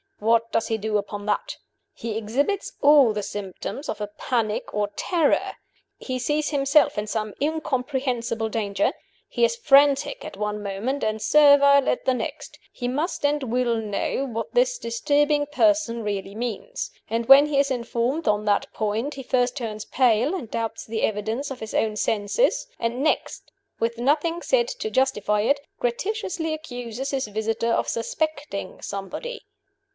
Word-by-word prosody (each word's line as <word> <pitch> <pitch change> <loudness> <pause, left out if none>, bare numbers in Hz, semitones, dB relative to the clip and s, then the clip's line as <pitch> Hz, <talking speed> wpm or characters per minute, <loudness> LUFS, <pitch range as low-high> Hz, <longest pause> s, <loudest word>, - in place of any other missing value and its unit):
What 230 +1 +2
does 225 - 0
he 225 - 0
do 215 0 0
upon 205 0 -5
that? 210 - -1 0.4
"He 225 -2 -5
exhibits 275 - -1
all 285 -6 +6
the 210 -1 -3
symptoms 205 - -6
of 210 - -4
a 210 - -2
panic 225 -4 -1
of 205 0 -2
terror; 335 -5 +1 0.4
he 255 -1 -4
sees 295 +4 0
himself 285 -1 +3
in 210 - -1
some 215 -1 -3
incomprehensible 255 -6 -1
danger; 200 -3 0 0.3
he - - -1
is 475 0 0
frantic 285 - +4
at - - -8
one 210 0 -2
moment 205 +8 -3
and 215 0 -1
servile 280 -1 +6
at - - -1
the 260 - +3
next; - - -6
he 245 - -4
must 290 +5 -2
and 290 0 +1
will 245 -1 0
know 220 +5 -2
what 230 -2 -5
this - - +3
disturbing 290 +5 +1
person 300 -6 +2
really 200 -1 -3
means. 245 - -4 0.2
And 230 0 -2
when 280 +2 +9
he 285 -2 +1
is 280 -1 +2
informed 245 +4 -1
on 210 0 +2
that 205 -1 +1
point, 220 +7 -2
he 270 - -7
first 245 0 +1
turns 220 -5 -5
pale 250 - +2
and 270 - -6
doubts 225 -1 -3
the 220 0 -3
evidence 220 +6 -1
of 260 - -6
his 220 - -7
own 215 -1 +1
senses; 210 - +1
and 235 +4 -1
next, 315 - -1 0.3
with 230 +1 -1
nothing 315 +6 +1
said 485 +3 +2
to - - -4
justify 210 -6 +1
it, 280 +6 +2 0.2
gratuitously 335 - -2
accuses 245 -3 -6
his 270 -4 -1
visitor 220 +2 -1
of - - +1
suspecting 290 -2 -3
somebody. 200 - -6
245 Hz, 160 wpm, -24 LUFS, 220-290 Hz, 0.4 s, when